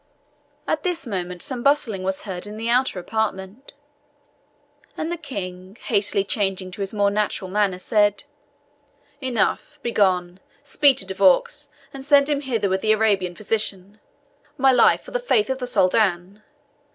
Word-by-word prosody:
At 310 - 0
this 345 -3 -2
moment 180 -5 -4
some 255 -3 -4
bustling 250 -8 +1
was 190 0 -2
heard 190 -1 -5
in 210 +1 -8
the 225 +1 -3
outer 250 -3 +2
apartment, 215 +6 -4 1.2
and 320 +2 -3
the - - -1
King, 195 - -8
hastily 200 -2 +1
changing 195 -3 -2
to 190 - -8
his 195 - -3
more 205 -2 +1
natural 205 -2 -2
manner, 200 -2 +1
said, 205 +1 +1 1.0
"Enough 260 +3 -1
begone 185 -6 +1 0.2
speed 285 -1 +3
to - - -2
De 190 - -4
Vaux, 195 +10 +2 0.2
and 270 -1 -8
send 285 0 +4
him 285 -1 0
hither 230 -7 -1
with 190 0 -1
the 215 - +3
Arabian 200 -5 +1
physician. 210 -1 -2 0.6
My 270 -1 +4
life 250 -2 +4
for - - -13
the - - -1
faith 445 - +1
of 265 - -3
the 250 - -4
Soldan! 190 -2 +1
210 Hz, 155 wpm, -22 LUFS, 190-260 Hz, 1.2 s, send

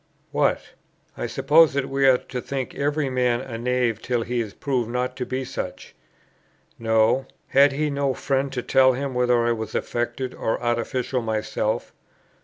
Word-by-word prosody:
What! - - +1 0.5
I - - -3
suppose 155 +1 +4
that 140 -1 0
we 135 0 +2
are 130 -1 +6
to 125 0 -6
think 135 -1 -4
every 145 +1 0
man 125 -2 +1
a 120 -3 -6
knave 120 -2 0
till 120 -2 -1
he 120 +1 -1
is 105 -3 -6
proved 125 -5 -1
not 125 +1 -2
to 125 - -3
be 130 0 -3
such. 130 - -6 0.9
Know! 115 +3 +2 0.2
had 140 +1 +5
he 150 +1 0
no 140 -2 0
friend 135 0 -1
to 125 -2 -3
tell 130 -1 +5
him 135 +1 -3
whether 125 -1 +2
I 120 - +2
was 110 -2 -4
"affected" 120 +2 -2
or 110 - -2
"artificial" 120 +2 -1
myself? 110 -1 -2
125 Hz, 170 wpm, -24 LUFS, 120-135 Hz, 0.9 s, are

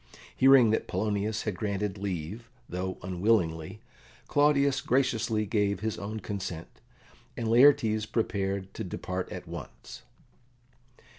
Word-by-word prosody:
Hearing 130 -4 +6
that 110 - 0
Polonius 105 +2 -1
had 105 -4 -2
granted 100 0 -2
leave, 100 +4 -5 0.2
though 95 +1 -4
unwillingly, 90 -1 0 0.5
Claudius 140 -2 +3
graciously 115 -4 +1
gave 100 -2 0
his 110 0 -2
own 105 +2 -5
consent, 90 -5 -6 0.6
and 115 - -2
Laertes 115 -3 +4
prepared 100 -4 -2
to 110 - -5
depart 90 0 -4
at - - -7
once. - - -9
105 Hz, 115 wpm, -28 LUFS, 95-115 Hz, 0.6 s, Hearing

